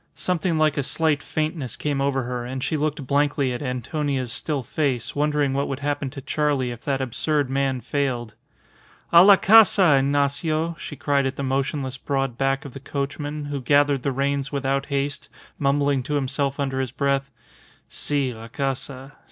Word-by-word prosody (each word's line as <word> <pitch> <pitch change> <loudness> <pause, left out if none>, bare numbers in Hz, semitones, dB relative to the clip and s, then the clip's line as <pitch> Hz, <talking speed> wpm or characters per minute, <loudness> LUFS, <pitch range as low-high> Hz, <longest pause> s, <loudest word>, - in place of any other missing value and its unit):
Something 175 -2 0
like 155 -1 +2
a - - +2
slight 150 +1 +1
faintness 155 -6 -2
came 145 -2 -2
over 135 -1 0
her, 125 0 -4
and 130 +1 -5
she - - -1
looked 150 -2 -2
blankly 140 -1 +1
at 120 - -5
Antonia's 130 -1 -2
still 145 -4 -2
face, 130 -3 -2
wondering 145 -1 +1
what 140 +1 0
would 135 0 -4
happen 145 -1 -1
to 135 +1 -8
Charley 140 -3 0
if 120 -1 -9
that 135 -2 0
absurd 140 +2 0
man 135 -2 0
failed. 125 -3 -2 0.8
"A 170 +1 +10
la 200 +1 +9
casa, 195 -7 +6
Ignacio," 145 +4 0
she 150 - -7
cried 140 0 +1
at 135 - -4
the 140 - -4
motionless 135 0 -2
broad 135 -3 -1
back 135 +3 0
of 135 - -8
the 135 - -8
coachman, 145 +2 -4
who 145 -1 -4
gathered 145 +1 +3
the 140 - -1
reins 140 +1 -1
without 140 -1 -1
haste, 140 0 -2 0.3
mumbling 140 -1 +2
to 145 +4 -3
himself 140 0 -1
under 135 -1 -1
his 130 -1 -1
breath, 140 +2 0 0.6
"Si, 140 -4 -1
la 115 0 -10
casa. 135 +2 -4
140 Hz, 175 wpm, -23 LUFS, 135-145 Hz, 0.8 s, A